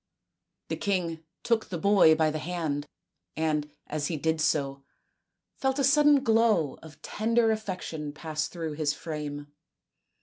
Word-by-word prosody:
The - - -2
king 175 -5 -1 0.2
took 230 -2 +1
the 175 - -3
boy 190 -3 +5
by 155 -1 +2
the 155 - -3
hand, 155 -3 -3 0.5
and, 155 -2 0 0.2
as 150 -1 -2
he 165 - -2
did 160 +1 0
so, 140 -3 0 0.8
felt 265 0 0
a 280 - +1
sudden 290 0 +5
glow 225 - +2
of 160 -2 -14
tender 225 +1 +1
affection 180 -8 -4
pass 155 +1 -3
through 165 -3 -5
his 150 -1 -1
frame. 145 -2 -6
160 Hz, 140 wpm, -28 LUFS, 150-215 Hz, 0.8 s, boy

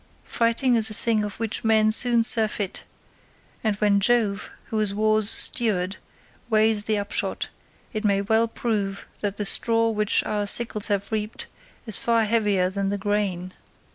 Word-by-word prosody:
Fighting 235 +2 0
is 220 -2 +2
a 215 - +2
thing 220 -1 +1
of 205 0 -7
which 225 -2 -4
men 220 -1 +3
soon 235 +1 +3
surfeit, 220 -4 0 0.8
and 215 -2 0
when 205 -1 +1
Jove, 210 -2 0 0.2
who 220 - -2
is 205 -2 -1
war's 215 0 +1
steward, 200 -7 +3 0.5
weighs 215 -1 +2
the 215 -1 0
upshot, 205 0 -3 0.4
it 215 0 -4
may 200 -2 +1
well 220 +3 +1
prove 210 -4 -3
that 205 -1 -4
the 210 - -3
straw 230 +3 +2
which 210 -1 +1
our 210 -1 -3
sickles 215 -1 +3
have 200 -1 -2
reaped 215 0 -4 0.4
is 220 -3 +2
far 230 -1 +1
heavier 210 -4 +1
than 195 0 -2
the 205 - -2
grain. 190 -3 -3
215 Hz, 160 wpm, -23 LUFS, 200-225 Hz, 0.8 s, men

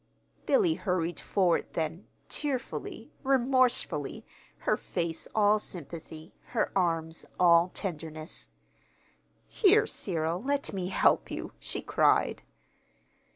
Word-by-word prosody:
Billy 390 -10 +4
hurried 180 - -1
forward 185 -4 +1
then, 165 +3 -3 0.2
tearfully, 275 -4 -4
remorsefully, 255 - +1 0.4
her - - +3
face 165 -1 -3
all 210 0 +4
sympathy, 160 -3 -6 0.2
her - - +2
arms 165 -3 0 0.2
all 170 0 +6
tenderness. 160 -3 -5 1.0
"Here, 425 +1 +4
Cyril, 170 - -2
let 280 +2 -1
me 185 -2 -2
help 185 - +3
you," - - -5
she - - -5
cried. - - +2
180 Hz, 100 wpm, -29 LUFS, 165-250 Hz, 1.0 s, all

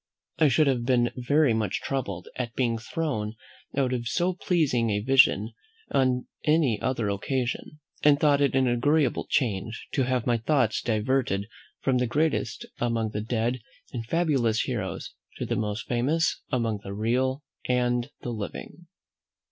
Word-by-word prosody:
I 155 - +6
should 150 +3 +4
have 130 -4 +1
been 120 -1 +2
very 140 +1 +3
much 110 -3 -1
troubled 100 -10 -3
at 120 -3 -4
being 115 -3 +1
thrown 110 -4 -3 0.4
out 130 -2 +2
of 120 -1 -2
so 175 +7 +1
pleasing 150 -10 +1
a 105 -1 +1
vision 115 -2 +4 0.4
on 130 -2 +2 0.2
any 150 -8 +2
other 120 -4 0
occasion; 130 +7 -2 0.2
but 145 -1 +5
thought 145 -2 +4
it 140 -2 +2
an 130 -1 +3
agreeable 135 +3 +2
change, 110 -3 -1
to 135 - +1
have 125 -2 0
my 120 -2 +2
thoughts 120 -3 +1
diverted 110 -3 0 0.3
from 130 -2 +2
the 125 - +1
greatest 150 +6 0
among 115 -2 0
the 105 - -3
dead 120 +2 -1 0.3
and 120 -3 -3
fabulous 130 -5 +1
heroes 105 -8 -4 0.2
to - - -3
the 120 - -1
most 105 -1 -2
famous 140 +8 +1
among 115 -4 0
the 100 0 -6
real 130 +6 0 0.3
and 125 0 +1
the 120 - -4
living. 120 +9 -7
125 Hz, 155 wpm, -27 LUFS, 115-135 Hz, 0.4 s, I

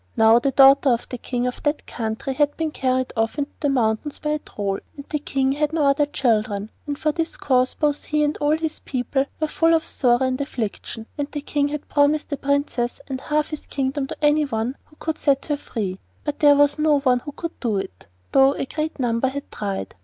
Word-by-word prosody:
Now 220 +1 +6
the 275 - +1
daughter 270 +1 +6
of 235 -2 +1
the 250 - -5
King 245 0 -2
of 250 - -3
that 295 0 -1
country 225 +3 -3
had 290 +1 +1
been 320 -1 -1
carried 255 -2 0
off 225 +4 0
into 290 0 -2
the 290 - +1
mountains 245 +2 0
by 300 - -2
a 300 - 0
Troll, 200 -7 -3 0.2
and 280 - -8
the 300 - -1
King 270 -2 0
had 295 +2 0
no 320 -2 +1
other 285 +1 +3
children, 215 -6 0 0.2
and 290 -1 -2
for 305 - +1
this 330 +1 -3
cause 255 -2 +2
both 295 -1 0
he 300 0 +1
and 295 +1 +1
all 295 +1 +2
his 320 -1 -3
people 265 +1 -1
were 310 - +1
full 330 +2 +3
of 320 - 0
sorrow 245 0 +2
and 260 +1 -1
affliction, 225 -4 -4
and 285 0 -2
the 295 - -4
King 285 0 0
had 295 0 -5
promised 290 +1 +2
the 285 - -2
Princess 280 -4 -1
and 265 -1 -4
half 300 0 0
his 305 - -7
kingdom 270 0 -1
to - - -7
anyone 275 -5 +1
who 305 - -23
could 320 0 -4
set 275 -2 +2
her 295 -2 -1
free; 195 -9 -4 0.2
but 295 -1 -3
there 290 -1 +7
was 290 +1 +3
no 300 -1 +4
one 255 -2 +3
who 290 - -8
could 335 +2 -6
do 225 -5 0
it, 95 - -6 0.2
though 270 +1 +5
a - - -2
great 310 +3 -3
number 240 -1 +1
had 280 +2 -5
tried. 195 - -4
280 Hz, 225 wpm, -23 LUFS, 245-295 Hz, 0.2 s, there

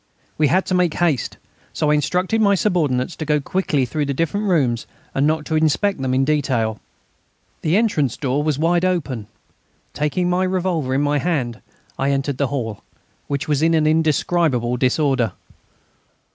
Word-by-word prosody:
We 150 - +3
had 185 +6 +2
to - - -2
make 180 -3 +2
haste, 165 -7 0 0.4
so 150 - +1
I - - +4
instructed 180 +8 +1
my 200 -2 +4
subordinates 165 -8 0
to - - -4
go 150 -1 +1
quickly 145 -3 0
through 150 +4 -2
the 140 - -2
different 200 +8 -1
rooms 130 - +1 0.3
and 140 +2 +2
not 155 -1 0
to 160 - -2
inspect 160 +3 +1
them 130 -1 -1
in 135 +1 +2
detail. 130 -7 0 0.8
The 165 +4 +2
entrance 160 - +1
door 135 0 0
was 150 -2 0
wide 170 +3 +2
open. 140 - -1 0.7
Taking 150 +5 0
my 180 +1 +1
revolver 180 -8 -1
in 140 - +2
my 145 0 +1
hand, 135 -8 -2 0.4
I 135 - +1
entered 135 -1 -1
the 140 - +2
hall, 115 -6 -4 0.5
which 140 +1 -2
was 150 -2 +1
in 165 +1 +3
indescribable 155 -4 +2
disorder. 130 -1 +1
150 Hz, 165 wpm, -20 LUFS, 135-175 Hz, 0.8 s, I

